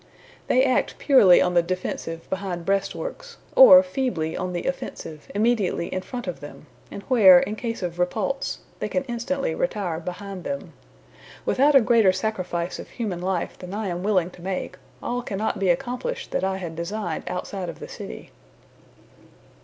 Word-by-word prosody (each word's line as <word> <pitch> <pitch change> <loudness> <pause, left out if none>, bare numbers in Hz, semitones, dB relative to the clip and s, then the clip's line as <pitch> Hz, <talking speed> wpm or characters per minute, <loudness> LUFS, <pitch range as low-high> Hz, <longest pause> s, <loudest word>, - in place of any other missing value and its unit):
They 255 - +4
act 255 -2 +1
purely 210 -11 +6
on 180 - 0
the 175 - +5
defensive 170 -2 -4
behind 185 -3 -4
breastworks, 470 - -3 0.2
or - - +10
feebly 250 - -2
on 185 0 -3
the 175 -1 -3
offensive 160 - -5
immediately 210 -5 +1
in 185 - -2
front 245 +5 -6
of 180 -3 -5
them, 145 +1 -11 0.2
and 200 - -8
where, 195 -8 +7
in 210 - -3
case 230 -3 -4
of 175 0 -4
repulse, 215 +9 -1 0.2
they - - -3
can 275 - -1
instantly 245 -3 -2
retire 195 -7 -2
behind 185 +2 -7
them. 280 0 -5 0.7
Without 285 +2 +3
a 270 - +8
greater 225 -4 +5
sacrifice 185 -3 -3
of - - -9
human 200 -8 -4
life 185 -1 -2
than 180 +2 -7
I 210 -2 -2
am 175 0 -3
willing 185 -3 +1
to 175 - -15
make, 185 0 -4 0.3
all 245 +1 -2
cannot 210 -2 -2
be 195 -2 +1
accomplished 250 - -2
that - - -1
I 190 0 0
had 170 -4 -6
designed 170 0 -4
outside 180 0 -4
of 170 - -8
the - - -8
city." 60 - -9
195 Hz, 170 wpm, -24 LUFS, 180-240 Hz, 0.7 s, or